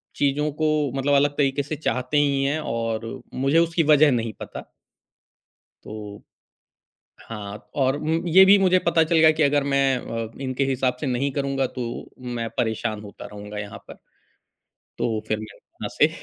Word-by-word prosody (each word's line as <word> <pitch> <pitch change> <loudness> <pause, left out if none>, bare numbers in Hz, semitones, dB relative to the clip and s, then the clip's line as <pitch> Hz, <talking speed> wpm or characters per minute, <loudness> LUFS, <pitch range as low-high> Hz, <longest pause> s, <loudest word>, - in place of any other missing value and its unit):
चीज़ों 145 +2 +1
को 155 - +3 0.3
मतलब 140 +1 +1
अलग 145 +1 +4
तरीक़े 140 0 +1
से 150 +2 -4
चाहते 130 -1 -1
ही 140 -2 +2
हैं 145 +3 0
और 115 -3 -3
मुझे 135 +5 +2
उसकी 165 0 +2
वज़ह 150 -1 +5
नहीं 115 -3 -1
पता। - - -8 1.1
तो 105 -1 -9 1.0
हाँ, 105 -2 -8
और 135 -1 +2
उम, 160 +2 -1
ये 190 +3 +8
भी 200 +1 +7
मुझे 185 -1 +4
पता 165 -1 +4
चल 160 +1 +1
गया 160 0 +7
कि 155 0 +1
अगर 145 0 +3
मैं 135 -1 +3
अ, 115 -2 -5
इनके 130 +1 -1
हिसाब 130 -1 0
से 145 - -1
नहीं 130 +3 0
करूँगा 135 -1 -1
तो, 120 -2 -6
मैं 120 -2 -4
परेशान 110 -2 -1
होता 100 - -10
रहूँगा 105 0 -9
यहाँ 105 0 -7
पर। - - -9 1.1
तो 110 -2 -1
फिर 110 - 0
मैं 110 -1 -10
वहाँ - - -9
से - - +6
135 Hz, 170 wpm, -23 LUFS, 115-150 Hz, 1.1 s, ये